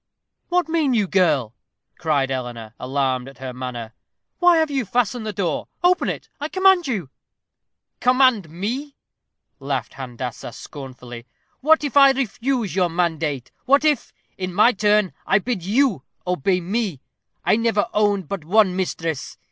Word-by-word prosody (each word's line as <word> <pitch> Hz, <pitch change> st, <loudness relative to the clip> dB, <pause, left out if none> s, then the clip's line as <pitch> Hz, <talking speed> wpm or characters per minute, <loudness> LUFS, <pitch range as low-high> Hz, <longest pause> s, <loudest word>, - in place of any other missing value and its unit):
"What 355 Hz, 0 st, +2 dB
mean 315 Hz, -6 st, +1 dB
you, 210 Hz, -3 st, +2 dB
girl?" 150 Hz, -, +2 dB, 0.5 s
cried 140 Hz, -5 st, +1 dB
Eleanor, 120 Hz, -4 st, -5 dB
alarmed 130 Hz, -1 st, -1 dB
at 135 Hz, -, -16 dB
her 130 Hz, -1 st, -6 dB
manner. 120 Hz, -3 st, -6 dB, 0.5 s
"Why 355 Hz, -2 st, +6 dB
have 320 Hz, -2 st, +2 dB
you 270 Hz, -2 st, 0 dB
fastened 240 Hz, +1 st, -1 dB
the -, -, -1 dB
door? 180 Hz, -6 st, -2 dB, 0.2 s
Open 360 Hz, +1 st, +3 dB
it, -, -, -5 dB
I 295 Hz, +2 st, -3 dB
command 375 Hz, -3 st, +4 dB
you." 190 Hz, -, -3 dB, 0.9 s
"Command 250 Hz, -, +3 dB
me!" 240 Hz, -, -4 dB, 0.6 s
laughed 135 Hz, -4 st, -3 dB
Handassah, 125 Hz, -2 st, -6 dB
scornfully. 125 Hz, -4 st, -10 dB, 0.3 s
"What 315 Hz, +3 st, +4 dB
if 285 Hz, -2 st, -3 dB
I 275 Hz, -1 st, +8 dB
refuse 250 Hz, -3 st, -1 dB
your 180 Hz, -2 st, +2 dB
mandate? 160 Hz, -6 st, -1 dB
What, 280 Hz, +3 st, +4 dB
if, 300 Hz, -5 st, +1 dB, 0.3 s
in 185 Hz, -1 st, -4 dB
my 215 Hz, +5 st, +6 dB
turn, 210 Hz, -2 st, +2 dB
I 195 Hz, -, +5 dB
bid 215 Hz, -1 st, -2 dB
you 215 Hz, -, +2 dB, 0.2 s
obey 180 Hz, +1 st, +1 dB
me? 195 Hz, -, -2 dB, 0.5 s
I -, -, +4 dB
never 230 Hz, -1 st, +1 dB
owned 205 Hz, -4 st, +1 dB
but 195 Hz, -2 st, -4 dB
one 190 Hz, +2 st, +3 dB
mistress. 165 Hz, -5 st, -3 dB
195 Hz, 150 wpm, -22 LUFS, -, 0.9 s, I